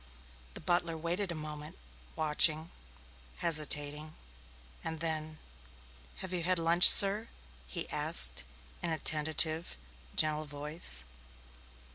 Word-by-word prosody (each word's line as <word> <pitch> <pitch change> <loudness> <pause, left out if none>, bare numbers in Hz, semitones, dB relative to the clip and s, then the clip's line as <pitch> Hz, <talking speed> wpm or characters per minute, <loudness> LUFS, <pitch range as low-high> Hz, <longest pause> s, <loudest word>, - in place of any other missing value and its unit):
The - - -10
butler 170 -2 -2
waited 175 +4 -4
a - - -6
moment, 150 -1 -9 0.4
watching, 155 +1 0 0.7
hesitating, 150 -1 0 0.7
and 160 -1 -7
then: 155 -1 -4 0.9
"Have 185 - -9
you 180 - -4
had 180 +2 -1
lunch, 170 +2 +4
sir?" 205 +3 +8 0.4
he 60 - -6
asked 60 0 +2 0.4
in 170 - -4
a 160 - -3
tentative, 155 +2 0 0.4
gentle 155 0 0
voice. 145 - -3
155 Hz, 105 wpm, -30 LUFS, 150-170 Hz, 0.9 s, sir